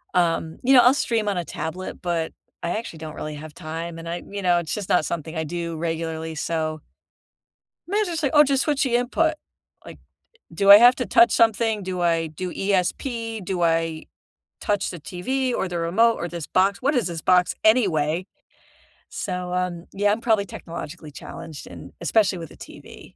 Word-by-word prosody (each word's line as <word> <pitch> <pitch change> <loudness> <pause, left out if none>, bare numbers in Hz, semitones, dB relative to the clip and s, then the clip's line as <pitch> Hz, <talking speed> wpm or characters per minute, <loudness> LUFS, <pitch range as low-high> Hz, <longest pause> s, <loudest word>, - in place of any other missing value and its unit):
Um, 165 -2 +1
you 265 +2 +4
know, 250 - +9
I'll 250 +2 +6
stream 225 -6 0
on 195 - -1
a 175 - -2
tablet, 160 +4 -6
but 170 -2 -2 0.3
I 170 - -1
actually 220 -7 -6
don't 155 -1 -7
really 155 0 -5
have 150 +1 -9
time, 165 0 -6
and 165 0 -7
I 175 +1 -4
you 200 0 -5
know, 175 -2 +3
it's 160 -3 -4
just 205 -3 -4
not 165 - +3
something 160 0 -4
I 160 - -1
do 170 0 -4
regularly, 160 0 -3
so 155 -1 -2 1.1
mine's 415 +1 +1
just 330 -2 -3
like, 280 - 0
"Oh, 295 - +9
just 275 -1 +1
switch 295 -3 +1
the 240 -2 +2
input," 315 +6 +1 0.5
like, - - -10 0.6
"Do 200 +4 +3
I 200 - +13
have 245 +2 +7
to 250 - -2
touch 235 - +5
something? 225 -2 +2
Do 185 -1 -4
I 165 -1 +1
do 175 +4 -6
ESP? 220 +3 -1
Do 180 -1 -2
I 165 -1 +1 0.6
touch 205 -1 0
the 175 - -8
TV 255 - -2
or 190 - -1
the 175 - -4
remote 225 +8 +3
or 175 - -3
this 170 -3 -6
box? 195 +4 +2
What 280 +2 +1
is 230 -8 +1
this 165 -2 -5
box 180 +1 +3
anyway?" 180 -7 +3 0.9
So, 180 -1 -4
um, 180 -1 -2
yeah, 205 +1 +1
I'm 225 - -2
probably 220 -4 +2
technologically 165 -3 -8
challenged 160 +1 -9
and - - -11
especially 195 +1 +2
with 165 -2 -7
the - - -14
TV. - - -12
180 Hz, 190 wpm, -23 LUFS, 165-225 Hz, 1.1 s, I